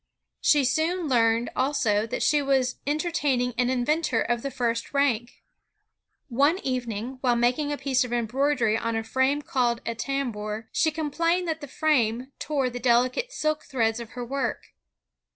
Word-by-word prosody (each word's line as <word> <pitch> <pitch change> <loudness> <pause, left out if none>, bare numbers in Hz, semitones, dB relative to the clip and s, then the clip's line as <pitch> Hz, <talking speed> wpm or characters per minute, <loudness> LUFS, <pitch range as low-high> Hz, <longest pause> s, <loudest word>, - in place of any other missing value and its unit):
She 290 -3 +4
soon 320 +6 0
learned 230 -2 +2
also 230 -6 +1
that - - -2
she 295 -1 +3
was 265 -2 +1
entertaining 290 -5 0
an 245 +1 +1
inventor 260 0 +1
of 240 -1 0
the 275 - -3
&^t 235 -2 -2
rank. 245 -4 0 0.8
One 285 +7 +2
evening, 250 -1 -3
while 245 -2 +2
making 250 +5 +1
a 290 - -2
piece 265 -2 +1
of 250 - -6
embroidery 240 0 +1
on 230 0 -2
a 225 - -1
frame 265 +5 +1
called 240 -3 0
a 230 - -1
tambour, 225 -4 -3
she 320 - +2
complained 335 +3 0
that 320 0 -2
the 290 - -7
frame 260 -4 +1
tore 275 -4 -1
the 245 - -5
deUcate 250 - +2
silk 310 -8 -1
threads 225 -3 0
of 235 -2 -9
her 245 - -3
work. 275 +3 -3
255 Hz, 160 wpm, -26 LUFS, 235-290 Hz, 0.8 s, She